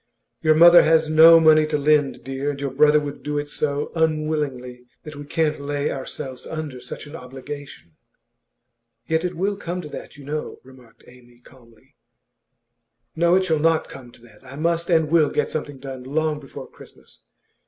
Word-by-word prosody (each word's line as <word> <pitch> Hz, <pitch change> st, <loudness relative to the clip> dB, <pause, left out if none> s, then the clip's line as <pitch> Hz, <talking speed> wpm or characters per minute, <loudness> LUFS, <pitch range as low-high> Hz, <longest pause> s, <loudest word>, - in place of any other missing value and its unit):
'Your 155 Hz, 0 st, +3 dB
mother 170 Hz, +2 st, +8 dB
has 160 Hz, 0 st, +2 dB
no 165 Hz, +1 st, +8 dB
money 155 Hz, -1 st, +5 dB
to 150 Hz, -, -1 dB
lend, 145 Hz, -2 st, +1 dB
dear, 135 Hz, +2 st, -4 dB
and 140 Hz, -1 st, -5 dB
your 140 Hz, -1 st, -3 dB
brother 150 Hz, +3 st, +4 dB
would 145 Hz, -1 st, -7 dB
do 150 Hz, 0 st, -4 dB
it 145 Hz, 0 st, -3 dB
so 145 Hz, 0 st, -3 dB
unwillingly 150 Hz, -6 st, -2 dB, 0.2 s
that 150 Hz, -1 st, -10 dB
we 145 Hz, 0 st, -9 dB
can't 155 Hz, -1 st, -1 dB
lay 145 Hz, 0 st, -2 dB
ourselves 130 Hz, -1 st, -7 dB
under 150 Hz, -5 st, -6 dB
such 125 Hz, -, -8 dB
an 145 Hz, +2 st, -11 dB
obligation.' 135 Hz, -, -10 dB, 1.1 s
'Yet 160 Hz, +1 st, -1 dB
it 180 Hz, 0 st, -3 dB
will 195 Hz, +4 st, -1 dB
come 180 Hz, -2 st, -5 dB
to 150 Hz, -, -10 dB
that, 150 Hz, -, -10 dB
you 140 Hz, -, -13 dB
know,' 150 Hz, +2 st, -5 dB
remarked 130 Hz, -2 st, -19 dB
Amy, 120 Hz, -1 st, -19 dB
calmly. 120 Hz, -3 st, -21 dB, 1.2 s
'No, 170 Hz, +2 st, +3 dB
it 190 Hz, 0 st, +2 dB
shall 160 Hz, -4 st, +1 dB
not 160 Hz, +1 st, +1 dB
come 130 Hz, -3 st, -11 dB
to -, -, -19 dB
that. 115 Hz, -3 st, -19 dB
I 140 Hz, -, -12 dB
must 170 Hz, +3 st, -1 dB
and 160 Hz, -3 st, +3 dB
will 155 Hz, -1 st, +3 dB
get -, -, -2 dB
something 145 Hz, -2 st, -5 dB
done 130 Hz, -1 st, -8 dB
long 150 Hz, +3 st, -2 dB
before 135 Hz, -3 st, -11 dB
Christmas. -, -, -18 dB
150 Hz, 180 wpm, -22 LUFS, 135-160 Hz, 1.2 s, mother